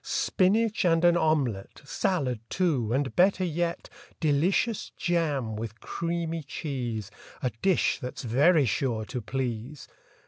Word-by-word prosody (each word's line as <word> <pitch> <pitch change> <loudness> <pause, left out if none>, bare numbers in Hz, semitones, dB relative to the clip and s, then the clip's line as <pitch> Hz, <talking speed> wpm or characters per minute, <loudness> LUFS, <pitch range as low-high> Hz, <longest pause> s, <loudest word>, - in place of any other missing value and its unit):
Spinach 215 +4 +1
and 165 -1 +3
an 175 0 +6
omelette, 145 -14 0
Salad, 140 - -1
too, 145 - 0
and 135 +1 0
better 185 +1 +4
yet 170 0 -2 0.3
Delicious 175 +9 +1
jam 150 -10 0
with 110 0 -6
creamy 170 -1 -3
cheese— 125 - -4 0.3
A 125 - +1
dish 190 -3 +2
that's 125 -3 -6
very 140 +6 +4
sure 115 -1 -1
to 125 +1 -5
please! 125 +3 -4
150 Hz, 125 wpm, -27 LUFS, 125-175 Hz, 0.3 s, an